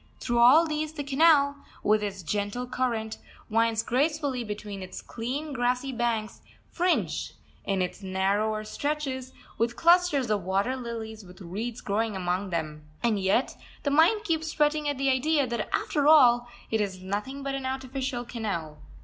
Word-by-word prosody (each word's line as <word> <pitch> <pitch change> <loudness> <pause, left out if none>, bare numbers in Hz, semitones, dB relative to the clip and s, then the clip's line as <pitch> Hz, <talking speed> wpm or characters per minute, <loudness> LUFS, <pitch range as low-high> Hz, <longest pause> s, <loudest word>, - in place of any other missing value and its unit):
Through 240 -1 0
all 265 +8 +7
these 310 0 -2
the 295 -2 -4
canal, 280 0 +4 0.3
with 215 0 +3
its 200 -3 -4
gentle 205 +7 -2
current, 235 -3 -2 0.3
winds 225 0 +2
gracefully 285 -1 0
between 210 -2 -6
its 185 0 -7
clean, 275 +6 -5
grassy 250 +1 0
banks, 235 -3 -2 0.3
fringed, 355 +1 0 0.3
in 195 -2 +1
its 180 +3 -5
narrower 200 +3 0
stretches, 265 +1 -3 0.3
with 235 +1 +1
clusters 335 -8 +4
of 205 -1 +1
water 195 +8 0
lilies 225 -3 -6
with 180 +1 -14
reeds 210 +6 -5
growing 215 +1 -1
among 185 +1 -1
them. 155 -3 -3 0.2
And 225 -4 +2
yet 195 +7 +1 0.3
the 285 - 0
mind 335 +9 +4
keeps 320 -5 -1
fretting 300 -1 +1
at 285 - -2
the 270 0 +2
idea 285 +2 +2
that 235 -3 -3
after 290 -1 0
all 245 -6 +6 0.2
it 220 -1 +2
is 190 -3 -3
nothing 210 +9 -4
but 275 0 -2
an 270 -1 -3
artificial 260 -1 -3
canal. 195 -11 -4
240 Hz, 160 wpm, -27 LUFS, 210-280 Hz, 0.3 s, all